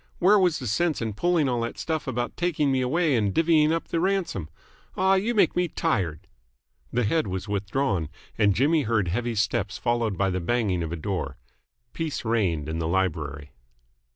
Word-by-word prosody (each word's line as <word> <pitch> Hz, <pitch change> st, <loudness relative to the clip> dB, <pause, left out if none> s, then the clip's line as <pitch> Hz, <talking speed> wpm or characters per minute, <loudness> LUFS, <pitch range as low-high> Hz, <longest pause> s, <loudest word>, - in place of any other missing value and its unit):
Where 200 Hz, +4 st, +5 dB
was 180 Hz, -4 st, +3 dB
the 130 Hz, -, -7 dB
sense 150 Hz, +8 st, 0 dB
in 110 Hz, -2 st, -3 dB
pulling 170 Hz, -, +1 dB
all 120 Hz, -2 st, 0 dB
that 115 Hz, -, -4 dB
stuff 160 Hz, -3 st, -3 dB
about 120 Hz, -1 st, -2 dB
taking 155 Hz, -5 st, 0 dB
me 130 Hz, -1 st, +1 dB
away 150 Hz, +3 st, +1 dB
and 105 Hz, -4 st, +1 dB
divvying 160 Hz, -, +3 dB
up 165 Hz, 0 st, -2 dB
the 165 Hz, -, 0 dB
ransom? 180 Hz, -, -1 dB, 0.5 s
Aw, 190 Hz, +1 st, +4 dB
you 210 Hz, +5 st, +1 dB
make 210 Hz, -, +3 dB
me 180 Hz, 0 st, +2 dB
tired!" 95 Hz, -, -2 dB, 0.6 s
The 125 Hz, +1 st, +1 dB
head 155 Hz, +7 st, +1 dB
was 95 Hz, -1 st, -4 dB
withdrawn, 100 Hz, -, -1 dB, 0.3 s
and 100 Hz, -2 st, +3 dB
Jimmy 150 Hz, +5 st, +3 dB
heard 110 Hz, -7 st, 0 dB
heavy 120 Hz, +5 st, -1 dB
steps 105 Hz, -, 0 dB
followed 115 Hz, -5 st, 0 dB
by 95 Hz, -1 st, +1 dB
the 95 Hz, 0 st, -2 dB
banging 100 Hz, -2 st, 0 dB
of 80 Hz, -1 st, -3 dB
a -, -, -2 dB
door. 80 Hz, -5 st, -4 dB, 0.6 s
Peace 160 Hz, -6 st, -3 dB
reigned 95 Hz, -10 st, 0 dB
in 80 Hz, +1 st, -3 dB
the 80 Hz, -, -1 dB
library. 75 Hz, -5 st, -2 dB
120 Hz, 185 wpm, -25 LUFS, -, 0.6 s, Where